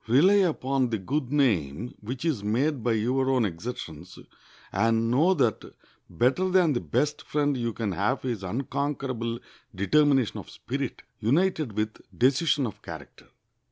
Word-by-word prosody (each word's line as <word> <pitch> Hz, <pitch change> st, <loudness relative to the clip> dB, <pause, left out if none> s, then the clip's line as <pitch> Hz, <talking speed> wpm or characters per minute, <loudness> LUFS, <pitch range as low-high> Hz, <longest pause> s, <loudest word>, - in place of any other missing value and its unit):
Rely 160 Hz, -, +5 dB
upon 135 Hz, -4 st, 0 dB
the 115 Hz, -, -1 dB
good 130 Hz, +7 st, -2 dB
name 110 Hz, -, +1 dB
which 125 Hz, +8 st, -5 dB
is 140 Hz, -11 st, 0 dB
made 125 Hz, +5 st, 0 dB
by 120 Hz, -, +2 dB
your 130 Hz, +5 st, +1 dB
own 130 Hz, -4 st, +3 dB
exertions, 90 Hz, -3 st, -6 dB, 0.5 s
and 115 Hz, +3 st, +2 dB
know 165 Hz, +9 st, +4 dB
that 125 Hz, -, +1 dB, 0.5 s
better 130 Hz, -, +1 dB
than 180 Hz, -5 st, +4 dB
the 120 Hz, -, 0 dB
best 145 Hz, -, -1 dB
friend 145 Hz, -1 st, 0 dB
you 120 Hz, -2 st, -1 dB
can 110 Hz, -2 st, -3 dB
have 105 Hz, +10 st, -1 dB
is 120 Hz, -6 st, -2 dB
unconquerable 130 Hz, +1 st, -2 dB, 0.4 s
determination 135 Hz, +4 st, +2 dB
of -, -, -10 dB
spirit, -, -, -5 dB, 0.2 s
united 155 Hz, -, +1 dB
with 110 Hz, +1 st, -3 dB, 0.2 s
decision 140 Hz, +3 st, +3 dB
of 110 Hz, -, -7 dB
character. -, -, -10 dB
125 Hz, 145 wpm, -27 LUFS, 110-145 Hz, 0.5 s, Rely